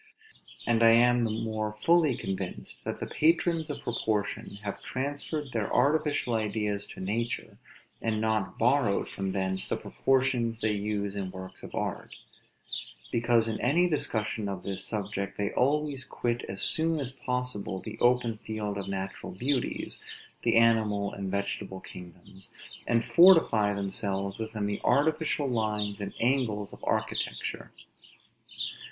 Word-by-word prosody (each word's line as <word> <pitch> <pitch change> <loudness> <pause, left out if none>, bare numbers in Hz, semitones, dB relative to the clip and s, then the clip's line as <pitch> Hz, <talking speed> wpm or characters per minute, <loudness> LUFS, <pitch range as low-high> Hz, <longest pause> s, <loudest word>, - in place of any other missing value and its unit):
And 115 -1 +2
I 115 0 +8
am 120 0 +5
the - - 0
more 110 -1 -2
fully 165 -7 +4
convinced, 95 -1 -5
that - - -3
the - - -3
patrons 165 0 +2
of 145 - -5
proportion 110 -4 -2
have 100 -1 -4
transferred 145 +2 -3
their 110 -4 -1
artificial 145 -1 +2
ideas 105 -2 0
to - - -10
nature, 110 +5 -2 0.4
and 110 -1 0
not 110 -2 0
borrowed - - +2
from 95 -1 -3
thence 95 0 -1
the - - -1
proportions 130 -4 +1
they 110 -1 +1
use 100 -1 -2
in 95 -2 -3
works 95 0 -9
of - - -8
art; - - -3 1.0
because 115 -1 +3
in 110 -1 -2
any 165 +8 +4
discussion 110 - 0
of 95 -2 -5
this 95 -1 -2
subject 100 -2 -3
they 100 -1 0
always 145 0 +1
quit 120 -2 -2
as 95 - 0
soon 160 0 +3
as 135 -3 -2
possible 125 -7 -2
the 110 +2 -8
open 120 -3 +2
field 105 -2 -3
of 100 - -5
natural 95 -1 -4
beauties, 125 +8 -1 0.4
the - - +3
animal 110 -3 +3
and 100 -1 -4
vegetable 100 -1 -3
kingdoms, 90 +2 -12 0.4
and 115 -1 +2
fortify 165 - +6
themselves 100 0 -2
within 110 -2 -3
the 100 0 -2
artificial 150 +2 +2
lines 105 -4 -1
and 100 0 -5
angles 115 -5 +1
of - - -13
architecture. - - -2
110 Hz, 140 wpm, -29 LUFS, 100-125 Hz, 1.0 s, I